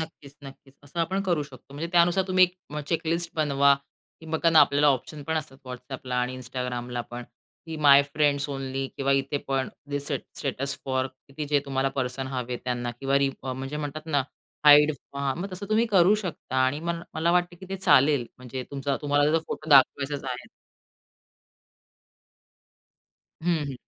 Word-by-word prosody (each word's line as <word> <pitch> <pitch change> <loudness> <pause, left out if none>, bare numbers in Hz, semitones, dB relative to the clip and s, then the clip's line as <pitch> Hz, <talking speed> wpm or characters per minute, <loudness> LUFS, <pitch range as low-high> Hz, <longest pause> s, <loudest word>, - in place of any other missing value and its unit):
नक्कीच-नक्कीच. 140 -3 -11
असं 160 +5 -4
आपण 190 +4 0
करू 175 -6 +1
शकतो. 140 0 -13
म्हणजे 160 +3 -3
त्यानुसार 175 +2 +4
तुम्ही 185 0 +6
1 180 0 -5 0.2
मग 150 0 -4
चेक-लिस्ट 165 0 -1
बनवा. 140 -2 +4 0.5
की 160 - -12
बघा 165 +1 +3
ना, 160 -1 +7
आपल्याला 145 +1 +4
ऑप्शन 145 +2 0
पण 160 0 0
असतात 140 -4 -5
WhatsAppला 125 0 -6
आणि 125 +1 -1
Instagramला 125 -1 -4
पण, 120 0 -6 0.4
की 160 - -5
माय 145 -2 +7
फ्रेंड्स 145 -1 +2
ओनली. 135 -1 -3
किंवा 140 0 +1
इथे 135 +2 -3
पण 135 -1 0
ते 145 - -21
दि 145 - -1
स्टेट 140 -1 -3
स्टेटस 140 0 -2
फॉर 130 -1 0
किती, 135 +3 -9
जे 145 -1 +2
तुम्हाला 135 -1 0
पर्सन 130 0 -2
हवे 125 -2 -3
त्यांना 120 -1 -2
किंवा 135 0 +2
रीड 135 -1 +1
फॉर 130 - -3
म्हणजे 135 +3 -5
म्हणतात 150 +1 -5
ना, 145 -4 +1 0.4
हाईड. 150 +1 +8 0.3
हां, 140 -1 -1
मग 195 0 -5
तसं 190 +2 -6
तुम्ही 225 +2 +3
करू 195 -2 +5
शकता 180 - -5
आणि 145 +4 -1
म 170 +1 -2 0.2
मला 165 +2 +1
वाटतं 175 0 +1
की 190 - -9
ते 195 - -3
चालेल. 145 -8 +4
म्हणजे 125 +1 -6
तुमचा 140 0 -2
तुम्हाला 145 0 +3
जर 165 - +3
फोटो 155 0 -6
दाखवायचाच 140 +1 +4
आहे. 125 -1 -5 3.0
हं, 170 -1 +2
हं. 135 - -5
140 Hz, 175 wpm, -26 LUFS, 135-160 Hz, 3.0 s, हाईड